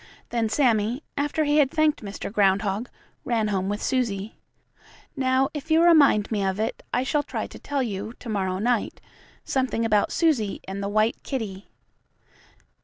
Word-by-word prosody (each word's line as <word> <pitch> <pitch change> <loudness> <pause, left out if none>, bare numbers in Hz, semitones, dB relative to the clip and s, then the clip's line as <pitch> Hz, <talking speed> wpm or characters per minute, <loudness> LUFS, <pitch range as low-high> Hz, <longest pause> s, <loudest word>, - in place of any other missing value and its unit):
Then 230 -2 0
Sammie, 235 +1 +1
after 295 +2 0
he 295 0 +2
had 285 -3 +4
thanked 310 0 +1
Mr. 200 0 -6
Groundhog, 200 +2 +1 0.3
ran 225 -3 0
home 190 -1 -1
with 205 +1 -3
Susie. 220 -6 -1 0.8
Now 260 -1 +2
if 300 +1 -7
you 320 +1 +5
remind 285 -12 +5
me 205 -3 0
of 190 +1 -1
it, 220 - -2
I 245 - +1
shall 290 +2 +1
try - - -4
to - - -11
tell 280 -2 -2
you, 215 -1 -4
to - - -11
morrow 190 -4 -1
night, 235 +3 0 0.5
something 255 -4 0
about 210 -2 +2
Susie 265 - +1
and 195 +1 -5
the 200 - -2
white 215 +2 +1
kittie. 210 -7 -5
225 Hz, 165 wpm, -25 LUFS, 205-270 Hz, 0.8 s, you